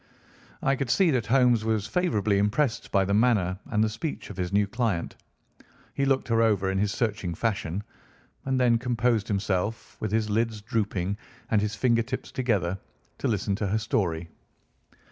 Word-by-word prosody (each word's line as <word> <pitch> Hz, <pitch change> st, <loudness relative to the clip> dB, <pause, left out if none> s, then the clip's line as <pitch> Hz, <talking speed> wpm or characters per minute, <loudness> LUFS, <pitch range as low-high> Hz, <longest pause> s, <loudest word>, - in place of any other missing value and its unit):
I 135 Hz, -, +3 dB
could 135 Hz, -2 st, -3 dB
see 180 Hz, +5 st, +4 dB
that 125 Hz, -5 st, 0 dB
Holmes 125 Hz, -2 st, +4 dB
was 110 Hz, -2 st, 0 dB
favourably 110 Hz, -, +1 dB
impressed 110 Hz, +5 st, 0 dB
by 100 Hz, -2 st, +3 dB
the 100 Hz, -, 0 dB
manner 100 Hz, -5 st, +2 dB
and 110 Hz, 0 st, +1 dB
speech 130 Hz, +1 st, -5 dB
of 95 Hz, -, -10 dB
his 90 Hz, -1 st, -2 dB
new 100 Hz, +1 st, +3 dB
client. 105 Hz, -5 st, -2 dB, 0.8 s
He 140 Hz, -, 0 dB
looked 135 Hz, -1 st, +1 dB
her 115 Hz, 0 st, +3 dB
over 100 Hz, -4 st, +2 dB
in 95 Hz, -, 0 dB
his 105 Hz, 0 st, +1 dB
searching 100 Hz, -6 st, -2 dB
fashion, 100 Hz, -3 st, -2 dB, 0.6 s
and 135 Hz, -1 st, 0 dB
then 120 Hz, -2 st, +4 dB
composed 120 Hz, -2 st, +1 dB
himself, 100 Hz, +1 st, -2 dB
with 110 Hz, -, -3 dB
his 110 Hz, 0 st, +1 dB
lids 110 Hz, +1 st, 0 dB
drooping 100 Hz, -3 st, -1 dB, 0.3 s
and 110 Hz, -2 st, +4 dB
his 105 Hz, 0 st, -2 dB
finger 115 Hz, +2 st, +3 dB
tips 130 Hz, +3 st, -5 dB
together, 100 Hz, -7 st, 0 dB, 0.4 s
to -, -, -1 dB
listen 100 Hz, -2 st, 0 dB
to 105 Hz, -, -1 dB
her 105 Hz, +3 st, +1 dB
story. 85 Hz, -7 st, -1 dB
110 Hz, 170 wpm, -27 LUFS, 100-120 Hz, 0.8 s, see